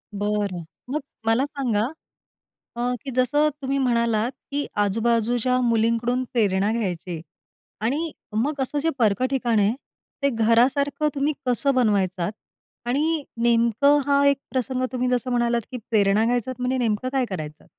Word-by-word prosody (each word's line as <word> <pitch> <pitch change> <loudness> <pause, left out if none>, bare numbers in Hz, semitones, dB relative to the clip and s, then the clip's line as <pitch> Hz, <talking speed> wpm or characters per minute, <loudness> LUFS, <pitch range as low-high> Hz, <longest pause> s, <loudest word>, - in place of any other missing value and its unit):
बरं. 205 -3 -1 0.3
मग 295 +4 -1 0.3
मला 225 +4 +3
सांगा 245 -7 -1 0.9
अ, - - -4 0.2
की 275 - -4
जसं 290 +4 +3
तुम्ही 275 +1 0
म्हणालात 235 -3 +1 0.2
की 285 0 -1 0.2
आजूबाजूच्या 235 +4 +1
मुलींकडून 230 +1 +1
प्रेरणा 205 -4 +2
घ्यायची 180 -6 -3 0.6
आणि 290 +9 -1 0.3
मग 280 +6 0
असं 280 +3 -2
जे 325 - +2
परक 220 0 +2
ठिकाण 240 -5 +1
आहे, 205 +1 +3 0.5
ते 280 - +4
घरासारखं 255 +6 +2
तुम्ही 285 +2 +1
कसं 260 +3 +2
बनवायचात 200 -6 +1 0.5
आणि 300 +5 +1 0.2
नेमकं 235 +4 +4
हा 280 0 +3
एक 280 0 +5
प्रसंग 255 0 -1
तुम्ही 250 0 0
जसं 250 0 0
म्हणालात, 240 -1 +1
की 255 - -5
प्रेरणा 205 -1 +3
घ्यायच 245 +1 0
म्हणजे 250 +1 0
नेमकं 230 0 0
काय 265 -2 +2
करायचं? 155 -5 -6
240 Hz, 140 wpm, -24 LUFS, 220-270 Hz, 0.9 s, एक